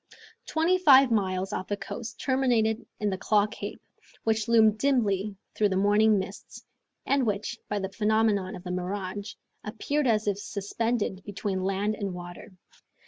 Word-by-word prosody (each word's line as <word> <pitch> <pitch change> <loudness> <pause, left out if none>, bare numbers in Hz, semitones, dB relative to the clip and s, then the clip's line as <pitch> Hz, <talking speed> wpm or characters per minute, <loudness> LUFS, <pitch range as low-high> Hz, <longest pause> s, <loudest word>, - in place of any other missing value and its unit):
Twenty 335 +3 +2
five 270 -6 +7
miles 190 -2 0
off 185 - -3
the 205 - -2
coast 230 +2 -7
terminated 240 -4 +1
in 210 -1 0
the 190 - -3
Claw 205 +1 +3
Cape, 215 +2 -7 0.4
which 220 0 0
loomed 220 -2 +4
dimly 210 -7 +1 0.2
through 210 -1 +2
the 190 - -1
morning 210 +2 +4
mists, 190 +1 -7 0.4
and 275 -1 +2
which, 215 +1 -2
by 210 - -1
the 195 -1 -3
phenomenon 215 -3 +1
of 180 - -10
the 180 - -5
mirage, 190 +2 -4 0.3
appeared 270 +7 -1
as 220 -2 +2
if 200 -1 0
suspended 205 -1 -2
between 200 -1 -3
land 195 +3 0
and 200 -4 -4
water. 175 +3 -9
210 Hz, 155 wpm, -27 LUFS, 195-225 Hz, 0.4 s, five